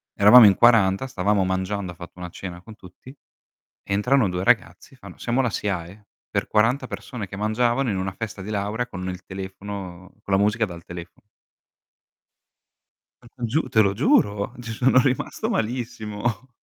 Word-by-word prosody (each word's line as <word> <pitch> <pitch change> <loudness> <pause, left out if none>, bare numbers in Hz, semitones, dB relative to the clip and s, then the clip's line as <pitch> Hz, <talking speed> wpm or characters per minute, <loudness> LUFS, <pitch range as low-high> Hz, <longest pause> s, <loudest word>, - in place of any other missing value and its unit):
Eravamo 105 +3 +9
in 95 - +5
40, 110 -1 +4
stavamo 100 -5 0
mangiando, 95 0 -2
ha - - -13
fatto 85 +1 -12
una 90 -1 -7
cena 90 0 -8
con 110 +3 -13
tutti, 105 +7 -15 0.7
entrano 105 +3 +2
2 90 0 -3
ragazzi, - - 0
fanno: - - -13
"Siamo 120 +3 0
la 125 -3 +1
SIAE," 100 0 -4 0.2
per - - -2
40 115 +6 +2
persone 115 -8 -7
che 95 - -8
mangiavano 120 +5 +1
in 100 - -1
una 95 0 -3
festa 105 -1 -6
di 100 - -7
laura 105 +4 -2
con 95 -4 -6
il 90 0 -6
telefono 95 -1 -8
con 100 - 0
la 95 - +3
musica 105 +2 +2
dal 85 -4 -8
telefono. 90 0 -10 2.0
Te 120 - -16
lo - - -2
giu 155 +7 +2
te 110 - +3
lo 100 -1 +2
giuro, 110 - +2
ci 120 -1 -7
sono 130 +3 +3
rimasto 130 - -1
malissimo. 115 - -3
105 Hz, 165 wpm, -23 LUFS, 95-120 Hz, 2.0 s, Eravamo